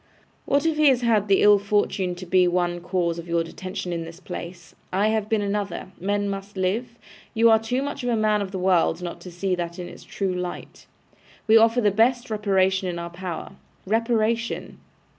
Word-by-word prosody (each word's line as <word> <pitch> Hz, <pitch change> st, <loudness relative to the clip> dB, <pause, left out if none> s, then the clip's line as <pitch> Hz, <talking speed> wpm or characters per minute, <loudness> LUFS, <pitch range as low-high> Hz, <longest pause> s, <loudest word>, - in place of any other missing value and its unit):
'What 285 Hz, +2 st, +2 dB
if 320 Hz, -2 st, +1 dB
he 305 Hz, -1 st, +5 dB
has 260 Hz, -3 st, +4 dB
had 220 Hz, -4 st, +2 dB
the 195 Hz, -1 st, +4 dB
ill 205 Hz, -1 st, +7 dB
fortune 200 Hz, -3 st, 0 dB
to 180 Hz, +1 st, -8 dB
be 180 Hz, 0 st, +4 dB
one 175 Hz, 0 st, 0 dB
cause 175 Hz, -2 st, -1 dB
of 170 Hz, -, -9 dB
your 170 Hz, 0 st, +1 dB
detention 180 Hz, +1 st, -6 dB
in 165 Hz, -1 st, -3 dB
this 165 Hz, +1 st, -10 dB
place? 175 Hz, -2 st, -8 dB, 0.2 s
I 200 Hz, +3 st, +2 dB
have 220 Hz, -1 st, -1 dB
been 220 Hz, -2 st, +1 dB
another; 200 Hz, -2 st, -3 dB
men 205 Hz, +2 st, -1 dB
must 195 Hz, 0 st, -6 dB
live; 220 Hz, +6 st, -1 dB, 0.4 s
you 230 Hz, +1 st, +5 dB
are 220 Hz, -, +6 dB
too 245 Hz, +4 st, -2 dB
much 285 Hz, -1 st, -5 dB
a 245 Hz, -1 st, +1 dB
man 215 Hz, -1 st, +2 dB
of 200 Hz, -, -3 dB
the 190 Hz, -, -5 dB
world 180 Hz, -2 st, +2 dB
not 175 Hz, -, -6 dB
to 180 Hz, -, -9 dB
see 185 Hz, +2 st, -2 dB
that 170 Hz, -1 st, -3 dB
in 180 Hz, -1 st, -6 dB
its -, -, -12 dB
true 195 Hz, -2 st, -3 dB
light. 180 Hz, -1 st, -6 dB, 0.6 s
We 220 Hz, -, +5 dB
offer 225 Hz, +2 st, +5 dB
the 210 Hz, -2 st, +3 dB
best 235 Hz, +3 st, +2 dB
reparation 190 Hz, -3 st, +1 dB
in 175 Hz, -, -4 dB
our 170 Hz, 0 st, -5 dB
power. 175 Hz, -1 st, -6 dB, 0.3 s
Reparation! 230 Hz, +2 st, 0 dB
195 Hz, 200 wpm, -24 LUFS, 180-220 Hz, 0.6 s, ill